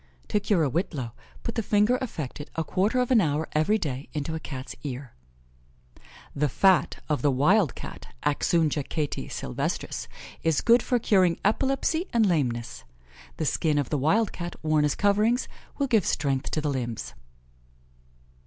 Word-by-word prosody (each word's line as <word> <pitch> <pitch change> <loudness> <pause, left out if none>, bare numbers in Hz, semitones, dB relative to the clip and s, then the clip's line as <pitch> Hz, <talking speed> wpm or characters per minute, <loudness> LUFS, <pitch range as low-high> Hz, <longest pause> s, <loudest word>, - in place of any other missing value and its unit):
To 210 - +2
cure 205 -5 +2
a - - +2
whitlow, 140 - -2 0.3
put 230 - -3
the 225 - 0
finger 210 +4 +3
affected 150 - -5
a 165 - 0
quarter 195 +9 0
of 250 0 0
an 235 -4 +6
hour 155 -1 0
every 155 +8 +2
day 140 -7 -4
into 150 +1 -3
a 160 - -3
Cat's 135 -4 -7
ear. 130 -3 -6 1.2
The 150 +1 +1
fat 190 +7 +3
of 150 -2 0
the 145 - +3
wild 150 - +3
Cat - - -9 0.2
(Axungia 155 0 +2
Cati 150 -2 -2
Sylvestris) 60 - -3 0.3
is 160 -3 +2
good 235 +1 +5
for 250 - +1
curing 190 -7 +3
epilepsy 275 - +1
and 230 -2 +4
lameness. 120 - -1 0.5
The 155 - -1
skin 150 +2 +1
of 145 -4 -1
the 150 - +1
wild 200 - +2
Cat 175 -1 -6
worn 155 -1 +3
as 150 - +1
coverings, 210 +5 +2 0.3
will 280 - +1
give 225 -8 +2
strength 135 -1 0
to 155 - -1
the 150 -1 0
limbs. 120 - -4
160 Hz, 160 wpm, -26 LUFS, 145-210 Hz, 1.2 s, an